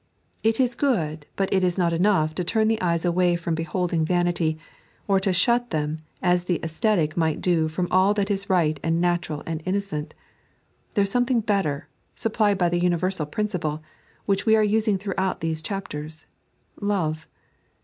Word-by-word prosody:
It 225 +2 +1
is 250 -2 +2
good, 165 - -1
but 195 0 0
it 190 -1 +2
is 180 0 +1
not 170 -2 +2
enough 165 -3 +2
to 180 - -2
turn 220 +5 +1
the 225 0 +1
eyes 170 -1 0
away 175 0 +2
from 170 -1 -2
beholding 165 +1 -1
vanity, 175 -2 +1 0.5
or 195 -1 +3
to 190 0 0
shut 240 +7 +2
them 155 0 -2 0.2
as 180 -1 +2
the 175 -3 0
ascetic 165 -1 0
might 160 -3 +1
do 165 -3 +2
from 175 +3 -2
all 190 +3 +4
that 205 0 0
is 200 0 -2
right 160 -5 +2
and 165 +1 0
natural 175 -4 -1
and 165 -1 -4
innocent. 185 -5 -3 0.8
There 200 - +4
is 195 - +1
something 245 0 +2
bettor, 195 -9 -1 0.3
supplied 215 -2 +1
by 175 -2 +2
the 175 0 0
universal 175 -2 0
principle, 160 -4 -2 0.4
which 200 -1 +1
we 220 -1 +5
are 215 - +4
using 215 -1 +2
throughout 190 -1 -2
these 160 -1 -1
chapters 155 -4 -6 0.3
— - - -27
Love. 165 -6 -1
180 Hz, 175 wpm, -24 LUFS, 160-200 Hz, 0.8 s, we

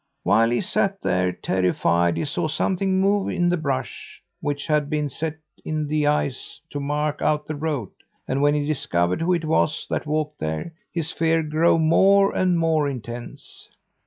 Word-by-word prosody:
"While 115 +1 +4
he 120 - +1
sat 195 0 0
there, 90 0 +1
terrified, 85 -2 +1
he - - -1
saw 155 +3 -1
something 190 +4 0
move 200 +1 +2
in 175 -1 +1
the 175 - +2
brush, 135 -6 -4 0.2
which 145 -1 -3
had 150 -2 +1
been 150 -1 -1
set 155 +3 -4 0.3
in 155 -1 -2
the 150 0 0
ice 145 -3 -1
to 145 - -3
mark 150 +1 -2
out 150 0 +1
the 155 - -4
road; 145 - -3 0.4
and 135 +1 0
when 145 +1 +4
he 145 -1 0
discovered 90 - 0
who 170 +2 +1
it 170 -2 -1
was 155 0 +1
that - - -2
walked 150 0 -2
there, 80 - -3 0.2
his 165 -2 -3
fear 165 0 +1
grew 155 +2 +3
more 195 +5 +4
and 185 -2 +2
more 160 -3 +2
intense. 120 -2 -8
150 Hz, 175 wpm, -23 LUFS, 140-165 Hz, 0.4 s, While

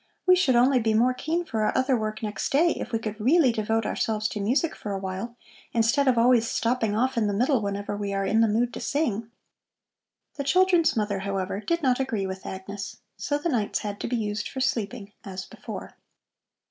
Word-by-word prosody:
"We 365 0 +7
should 315 -9 +3
only 255 +2 +5
be 220 -1 +1
more 245 +3 +4
keen 325 +7 -2
for 220 -7 -2
our 215 - +1
other 260 0 +2
work 215 -1 -3
next 210 -2 -3
day, 330 +5 +4
if - - -5
we 225 - +1
could 215 -1 -5
really 275 +3 +4
devote 225 0 0
ourselves 215 -1 -1
to 220 - -5
music 255 +11 +1
for 205 - -5
a - - -1
while, 195 +5 -5 0.4
instead 240 +5 +2
of 255 -2 +4
always 235 -1 +4
stopping 230 -3 0
off 255 +2 +1
in 215 - +1
the 205 - -1
middle 250 +3 +2
whenever 200 0 -3
we 205 -1 -3
are 195 0 -1
in 220 +3 +3
the 225 - +5
mood 235 +3 +1
to - - -5
sing." 230 -7 -1 1.1
The 280 - -2
children's 350 -1 +3
mother, 205 -2 0
however, 195 0 -2
did 335 +8 -1
not 255 -1 +2
agree 225 -7 -1
with 190 0 -6
Agnes, 195 +1 -6 0.2
so 290 - -1
the 290 - -3
nights 225 -8 0
had 205 -1 -5
to - - -3
be 245 - -1
used 210 -1 -2
for 265 - -6
sleeping 215 -4 -2
as 185 -1 -6
before. - - -9
225 Hz, 210 wpm, -26 LUFS, 205-260 Hz, 1.1 s, We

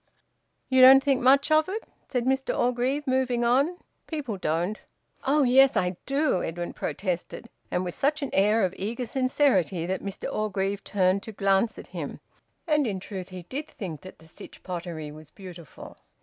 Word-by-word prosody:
"You 260 -1 +4
don't 265 +1 +9
think 275 -3 +2
much 275 +4 +4
of 310 +2 +4
it?" 435 +4 -4 0.3
said 245 -2 -1
Mr 265 +1 0
Orgreave, 250 +4 0
moving 255 -2 +1
on. 275 +9 +2 0.3
"People 290 -9 -4
don't." 175 +3 -2 0.5
"Oh 290 +2 +4
yes! 265 +1 +5
I 180 0 0
do!" 275 - +1
Edwin 175 +1 -4
protested, 185 +4 -4 0.2
and 180 - -1
with 175 -1 -4
such 295 +2 0
an 275 - -4
air 210 +2 +3
of 185 - -3
eager 230 +5 -3
sincerity 240 - +1
that 185 +2 -2
Mr 195 -1 -5
Orgreave 200 -1 -2
turned 190 -1 +1
to 220 - -8
glance 195 +2 +1
at - - -9
him. - - -5 0.5
And 300 -5 +2
in 195 -3 -2
truth 185 -1 -7
he 185 -1 -8
did 280 - -6
think 185 - -7
that 185 - -12
the 160 - -17
Sytch 160 - -11
Pottery 170 -4 -5
was 155 0 -12
beautiful. 175 -3 -12
220 Hz, 175 wpm, -26 LUFS, 185-265 Hz, 0.5 s, don't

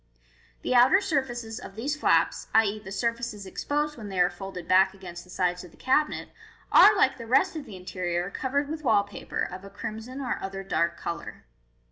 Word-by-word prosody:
The - - 0
outer 250 +10 +6
surfaces 255 - -2
of 195 - -10
these 275 +7 -2
flaps 300 - +2
(i.e., 215 -1 +4
the 190 -2 -10
surfaces 230 -1 -2
exposed 295 +8 -2
when 210 -2 -7
they 190 -2 -3
are 180 0 +4
folded 180 -1 -8
back 190 +1 +4
against 175 -2 -9
the 180 - -20
sides 180 0 -1
of 180 - -11
the - - -21
cabinet) 300 +4 +1 0.4
are, 420 0 +8
like 265 -7 +3
the 230 - -7
rest 270 +10 +3
of 305 -3 -5
the 215 -6 -10
interior, 180 0 -3
covered 280 +5 -1
with 310 +1 -5
wall 220 -6 +4
paper, 200 -1 -5
of 185 +1 -5
a 200 - -9
crimson 220 +6 -7
or 260 -3 -2
other 195 0 -5
dark 170 -3 0
colour. 170 - -6
215 Hz, 195 wpm, -27 LUFS, 185-265 Hz, 0.4 s, are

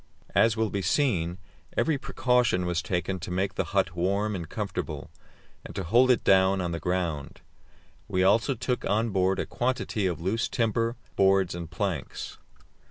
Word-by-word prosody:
As 115 -1 +4
will 110 -2 0
be 100 - -1
seen, 90 - +1 0.4
every 155 -4 +2
precaution 125 -9 +1
was 90 0 0
taken 90 +1 -2
to 85 - -6
make 95 +1 -1
the - - -1
hut 95 -3 0
warm 100 +4 0
and 85 -4 -5
comfortable, - - -4 0.5
and - - -10
to 95 - -2
hold 120 +9 +4
it 125 - +3
down 95 0 +4
on 90 -2 -2
the 85 - -3
ground. 85 -6 -2 0.7
We 95 0 +1
also 115 +7 +3
took 125 +2 -2
on 110 +2 +1
board 95 0 +2
a - - -1
quantity 120 -5 -1
of 90 - -2
loose 110 +8 -1
timber, 115 0 0 0.2
boards 95 -2 +3
and 85 -2 -6
planks. 85 -5 -4
95 Hz, 165 wpm, -27 LUFS, 90-115 Hz, 0.7 s, As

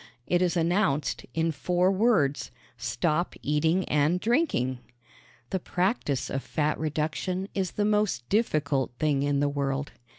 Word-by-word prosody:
It 175 0 +1
is 180 -1 +1
announced, 165 -4 +1
in 165 0 +1
four 180 +4 +1
words: 185 - +2 0.3
Stop 170 +4 -1
eating 160 +5 +1
and 150 +4 +2
drinking. 215 - +1 0.7
The 190 - 0
practice 180 - -1
of 135 - -1
fat 150 +1 -1
reduction 160 +5 -2
is 190 -2 -2
the 205 - 0
most 210 - +1
difficult 150 - +1
thing 145 -2 +1
in 140 0 +1
the 145 - +3
world. 140 0 -2
160 Hz, 135 wpm, -27 LUFS, 145-185 Hz, 0.7 s, the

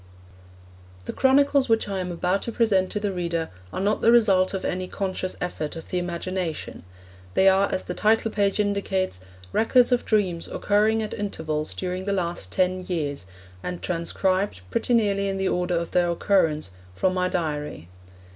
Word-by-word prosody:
The - - -4
chronicles 275 0 +3
which 225 -1 +2
I 195 -1 -2
am 180 -1 -3
about 180 +3 0
to 235 - -4
present 205 -5 +2
to 210 - -2
the 205 -1 -1
reader 170 -3 -2 0.2
are - - -4
not 205 +3 +1
the 230 - +5
result 195 -6 +5
of 195 - -4
any 185 0 -2
conscious 185 -1 -3
effort 165 -4 -4
of 165 - -9
the 180 - +1
imagination. 175 -1 -4 0.5
They 190 - +5
are, 195 +1 +4
as 185 - -1
the 180 - -5
title 220 +3 +2
page 200 -1 +1
indicates, 200 - 0 0.3
records 245 - +4
of 245 - +2
dreams 185 -6 0
occurring 215 +2 +1
at 215 - -5
intervals 155 -7 -3
during 185 0 -3
the 200 - 0
last 170 - -2
ten 185 0 +1
years, 145 - -3 0.3
and 180 -1 -4
transcribed, 185 - -1
pretty 245 - +1
nearly 200 -3 +2
in 195 - -2
the 190 0 0
order 180 -1 0
of 170 0 -3
their 175 -1 +2
occurrence, 165 - +1 0.2
from 185 - +1
my 180 0 0
diary. 150 - -3
185 Hz, 175 wpm, -25 LUFS, 175-205 Hz, 0.5 s, the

